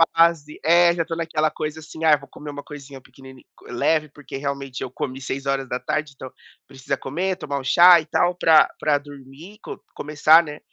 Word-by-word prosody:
fase. 165 Hz, -3 st, +2 dB
É, 170 Hz, +2 st, +5 dB
já 165 Hz, -2 st, -1 dB
tô 165 Hz, -, -5 dB
naquela 160 Hz, -2 st, -1 dB
coisa 155 Hz, +1 st, -5 dB
assim 160 Hz, +1 st, -10 dB
"Ai 155 Hz, -2 st, +5 dB
vou 140 Hz, -, -15 dB
comer 150 Hz, -1 st, -10 dB
uma 145 Hz, 0 st, -9 dB
coisinha, 140 Hz, -2 st, -11 dB
pequeni 130 Hz, -1 st, -16 dB, 0.2 s
leve". 155 Hz, +5 st, 0 dB
Porque 145 Hz, -1 st, -10 dB
realmente, 140 Hz, -2 st, -5 dB
eu 130 Hz, -, -4 dB
comi 135 Hz, -1 st, -6 dB
6 135 Hz, +1 st, -5 dB
horas 135 Hz, -1 st, -2 dB
da 125 Hz, -, -3 dB
tarde, 155 Hz, +1 st, -3 dB
então, 130 Hz, -1 st, -10 dB, 0.4 s
precisa 135 Hz, -1 st, -5 dB
comer, 180 Hz, +7 st, -3 dB
tomar 145 Hz, -5 st, -4 dB
um -, -, -9 dB
chá 175 Hz, +6 st, +7 dB
e -, -, -13 dB
tal, 175 Hz, +3 st, 0 dB
pra 160 Hz, -3 st, +5 dB
pra 150 Hz, -1 st, +1 dB
dormir, 145 Hz, +7 st, -13 dB
co -, -, -8 dB
começar, 155 Hz, +3 st, +4 dB
né, 150 Hz, -1 st, -9 dB
150 Hz, 200 wpm, -22 LUFS, 135-160 Hz, 0.4 s, chá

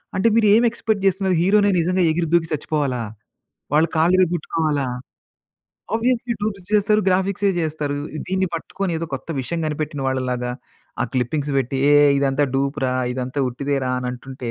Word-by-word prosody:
అంటే 190 Hz, +4 st, +2 dB
మీరు 225 Hz, -2 st, +4 dB
ఏమి 230 Hz, +3 st, +5 dB
ఎక్సపెక్ట్ 220 Hz, -3 st, -2 dB
చేస్తున్నారు 190 Hz, -1 st, +1 dB
హీరో‌నే 205 Hz, +3 st, +4 dB
నిజంగా 180 Hz, +2 st, +1 dB
ఎగిరి 165 Hz, +1 st, -1 dB
దూకి 170 Hz, -1 st, +3 dB
చచ్చిపోవాలా? 145 Hz, -4 st, -1 dB, 0.7 s
వాళ్ళు 155 Hz, +3 st, +4 dB
కాళ్ళు 165 Hz, +3 st, +4 dB
విరగొట్టు‌కోవాలా? 160 Hz, -5 st, 0 dB, 1.1 s
ఆబ్వియస్లీ 240 Hz, +1 st, 0 dB
డూప్స్ 200 Hz, -3 st, -3 dB
చేస్తరు 210 Hz, 0 st, +3 dB
గ్రాఫిక్సే 190 Hz, +2 st, +1 dB
చేస్తరు. 150 Hz, -3 st, -2 dB, 0.3 s
దీన్ని 190 Hz, +1 st, 0 dB
పట్టుకొని 185 Hz, +3 st, -3 dB
ఏదో 165 Hz, -, -4 dB
కొత్త 135 Hz, -, -8 dB
విషయం 170 Hz, +6 st, -3 dB
కనిపెట్టిన 150 Hz, -1 st, -3 dB
వాళ్ళలాగా 125 Hz, -2 st, -1 dB, 0.5 s
ఆ -, -, +1 dB
క్లిప్పింగ్స్ 140 Hz, +4 st, -1 dB
పెట్టి 135 Hz, +1 st, -2 dB
ఏ -, -, +6 dB, 0.2 s
ఇదంతా 140 Hz, +1 st, +2 dB
డూప్‌ 140 Hz, +2 st, -1 dB
రా! 125 Hz, -, -1 dB, 0.2 s
ఇదంతా 130 Hz, +2 st, -3 dB
ఉట్టిదే‌రా! 135 Hz, +1 st, -2 dB
అని 125 Hz, 0 st, -3 dB
అంటుంటే 130 Hz, -1 st, -7 dB
155 Hz, 150 wpm, -21 LUFS, 135-190 Hz, 1.1 s, ఏ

